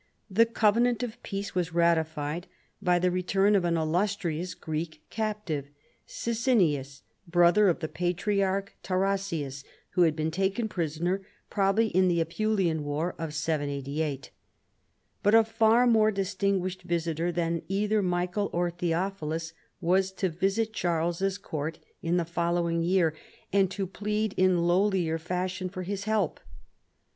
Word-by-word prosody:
The 230 +4 +5
covenant 230 +2 +2
of 240 -2 -6
peace 200 0 -5
was 175 -2 -2
ratified 160 0 +1 0.3
by 180 -2 +3
the 180 +1 +2
return 195 +3 +2
of 195 - +3
an 170 -1 +1
illustrious 175 +1 -1
Greek 155 -1 -5
captive, 210 -10 -2 0.4
Sisinnius, 180 - 0 0.2
brother 175 +4 +5
of 175 -1 +1
the 155 - -1
Patriarch 195 +3 -1
Tarasius, 185 -7 -1 0.3
who 180 - +1
had 160 -3 +4
been 155 0 -1
taken 195 +6 0
prisoner 175 +1 -1 0.3
probably 205 +2 +2
in 185 -1 +3
the 170 -1 +2
Apulian 170 -1 0
war 150 +4 -2
of 165 -1 -3
Y88. 145 -1 -2 0.9
But 205 +2 +4
a 225 - +7
far 225 +2 +3
more 220 -3 +5
distinguished 195 -2 -1
visitor 170 -1 -1
than 170 -1 -1
either 210 +3 +1
Michael 180 +2 0
or 175 0 0
Theophilus 165 -2 -2 0.3
was 185 +2 +2
to 190 0 -1
visit 195 +6 0
Charles's 175 +2 0
court 160 -4 -4 0.2
in 170 +1 +1
the 170 - +1
following 170 0 0
year, 170 -2 +2 0.4
and 195 -2 +4
to 195 +1 -3
plead 210 +2 -2
in 185 -2 +3
lowlier 175 -2 +2
fashion 185 +2 -3
for 185 0 -6
his 200 +2 -4
help. 215 -6 0
180 Hz, 135 wpm, -28 LUFS, 165-200 Hz, 0.9 s, a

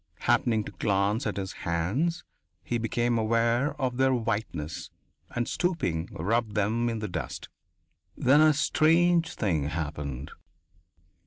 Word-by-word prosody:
Happening 110 -3 +2
to - - -8
glance 105 +4 0
at - - -3
his 95 -1 -3
hands, 125 - -1 0.4
he 120 - -1
became 120 +1 0
aware 115 +6 +1
of 125 -3 -1
their 130 0 +3
whiteness, 105 -10 -3 0.4
and 120 -1 -2
stooping, 95 - -1
rubbed 110 +5 -1
them 110 +4 +1
in 115 - -2
the 105 -1 -3
dust. 80 -9 -5 0.7
Then 140 +4 +5
a 155 0 +7
strange 165 +3 +3
thing 85 -10 0
happened. 75 -3 -4
115 Hz, 130 wpm, -28 LUFS, 95-130 Hz, 0.7 s, a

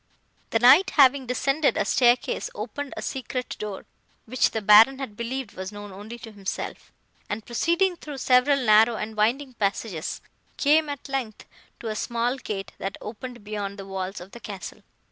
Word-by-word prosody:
"The - - +2
Knight, 260 +11 +7
having 270 -2 +5
descended 275 +4 +1
a - - +1
staircase, 245 -1 +2
opened 250 +7 -5
a - - -4
secret 255 -1 -4
door, 210 -2 -6 0.4
which 255 +2 +2
the 220 - -2
Baron 220 +6 +7
had 265 -6 -6
believed 235 0 -4
was 190 +1 -6
known 205 -1 -9
only 210 +5 -9
to 225 -1 -10
himself, 200 -2 -6 0.4
and, 210 +1 -4
proceeding 340 - +1
through 295 -4 -8
several 255 +2 +4
narrow 220 +2 +6
and 215 0 -5
winding 250 +6 +1
passages, 200 -5 -2 0.4
came, 300 +1 +3
at 285 -1 -6
length, 260 -6 -4 0.4
to 230 - -5
a 215 - -3
small 240 +4 -1
gate, 195 -6 -5
that 195 0 -4
opened 240 +1 -8
beyond 205 -1 -5
the 195 - -8
walls 195 0 -4
of 180 +2 -11
the 235 - -10
castle. 200 -4 -8
230 Hz, 170 wpm, -25 LUFS, 210-265 Hz, 0.4 s, Knight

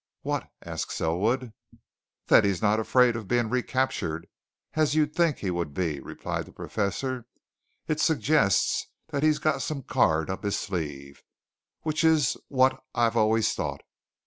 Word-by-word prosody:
"What?" - - -2
asked - - -4
Selwood. 110 +9 0 0.7
"That - - +6
he's 100 -3 +1
not 105 0 +2
afraid 125 +1 +4
of 110 -4 -5
being 120 -1 +1
recaptured 125 -10 -1 0.5
as 155 -1 +2
you'd 150 -1 +2
think 170 -4 +2
he 95 - -2
would 85 -5 -3
be," 80 -6 -1
replied - - -5
the - - -13
Professor. 120 +4 -3 0.6
"It 155 - -1
suggests 150 - +2 0.2
that 145 -3 -2
he's 155 0 +3
got 155 -1 0
some 145 -3 -3
card 80 -6 +2
up 95 - -5
his 100 0 0
sleeve 75 -7 -5 0.6
which 155 +1 -1
is 160 -4 +4
what 130 -1 +2
I've 115 -1 +2
always 110 0 +3
thought. - - -3
115 Hz, 145 wpm, -27 LUFS, 95-140 Hz, 0.7 s, That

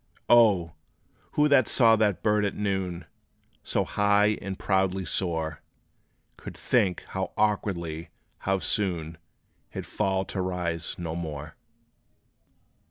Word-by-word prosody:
O! 105 -9 +5 0.6
who 150 0 +4
that 130 -5 +5
saw 115 -3 +5
that 105 -4 +1
bird 105 -1 +2
at 100 - -1
noon 95 -4 -2 0.6
So - - 0
high 105 +1 +2
and 95 -1 -5
proudly 95 -1 0
soar, 80 -4 -2 0.8
Could - - -9
think 105 -8 +1
how 95 0 -3
awkwardly 85 -6 -1 0.3
how 95 0 0
soon, 85 -5 -1 0.5
He - - -7
'd - - -12
fall 95 -2 -1
to 95 - -3
rise 85 -3 -2
no 85 -2 -4
more? 80 -2 -6
95 Hz, 120 wpm, -27 LUFS, 85-105 Hz, 0.8 s, O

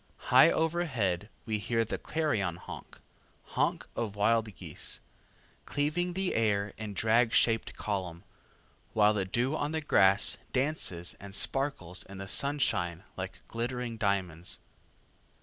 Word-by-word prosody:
High 130 +6 +8
overhead 130 - 0 0.2
we 110 -2 -1
hear 115 +2 0
the - - -4
clarion 130 - 0
honk, 90 - -10 0.4
honk - - -1
of 110 -3 -3
wild 110 0 +2
geese, - - -4 0.7
cleaving 155 +5 0
the 190 0 -1
air 105 -2 +1
in 105 -2 -5
drag 115 +2 +3
shaped 115 -1 +2
column, 95 -4 -3 0.7
while 105 -1 +5
the 100 -3 0
dew 120 +9 0
on 150 0 -2
the 160 - 0
grass 100 -9 +5 0.2
dances 125 - 0
and 100 0 -8
sparkles 100 -5 0
in 100 0 -6
the 95 0 -6
sunshine 100 - +1
like 95 -1 -6
glittering 120 0 -3
diamonds. 95 -5 -1
110 Hz, 130 wpm, -30 LUFS, 95-135 Hz, 0.7 s, High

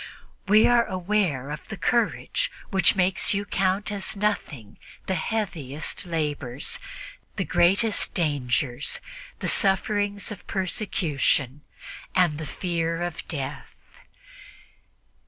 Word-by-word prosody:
We 210 +2 +6
are 240 -1 +5
aware 185 -8 0
of 150 - -7
the 215 - -6
courage 240 - +1 0.2
which 190 -1 +4
makes 190 +3 +3
you 200 +1 -1
count 195 +2 0
as 200 0 -2
nothing 160 - -2 0.3
the 190 - -1
heaviest 180 - -2
labors, 145 -5 -2 0.6
the - - -1
greatest 200 +5 +2
dangers, 140 -4 0 0.4
the - - -1
sufferings 205 +1 +1
of 210 - -9
persecution 155 - 0 0.5
and 175 -5 +3
the 155 - -5
fear 165 0 -2
of 175 -2 -5
death. 140 -5 -5
185 Hz, 105 wpm, -25 LUFS, 150-205 Hz, 0.6 s, We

